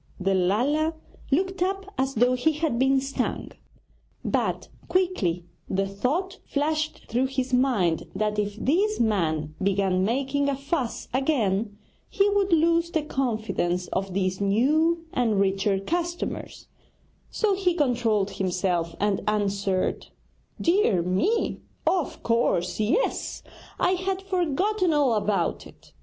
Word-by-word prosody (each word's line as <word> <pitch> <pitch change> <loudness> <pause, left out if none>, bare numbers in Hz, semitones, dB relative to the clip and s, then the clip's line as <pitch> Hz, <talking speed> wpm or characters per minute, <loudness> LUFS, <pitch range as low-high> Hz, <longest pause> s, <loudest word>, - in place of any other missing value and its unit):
The 195 +1 +1
Lala 255 - +1 0.3
looked 375 +6 0
up 390 +1 -1
as 265 +1 -1
though 245 +3 +4
he 255 +6 +2
had 300 -6 -1
been 270 +1 +4
stung; 275 +1 -3 0.7
but - - -1 0.2
quickly 220 - 0 0.2
the 195 0 +1
thought 305 - -2
flashed 305 +2 -1
through 250 +3 0
his 260 -1 -3
mind 235 -11 +2
that 210 +1 0
if 205 -1 -1
this 385 - +1
man 160 -9 0
began 190 -1 +1
making 275 +6 0
a 280 - 0
fuss 275 -2 -3
again 220 -7 0 0.3
he 400 -1 +2
would 400 -1 +1
lose 335 +1 +3
the 320 -3 -1
confidence 220 - -1
of 190 -1 -3
these 185 0 0
new 305 +12 +2
and 225 -5 +1
richer 195 0 +1
customers; 345 - -3 0.6
so 430 -2 +1
he 370 -2 +1
controlled 235 - +1
himself, 180 -3 -1
and 205 -1 +1
answered: 200 -2 0 0.5
'Dear 335 - +3
me, 190 - 0 0.2
of 360 -5 0
course, 230 -7 +1
yes! 255 - 0 0.4
I 360 - +3
had 375 +1 -1
forgotten 370 +1 +1
all 285 -5 +3
about 210 -1 0
it.' - - -19
255 Hz, 125 wpm, -25 LUFS, 195-330 Hz, 0.7 s, though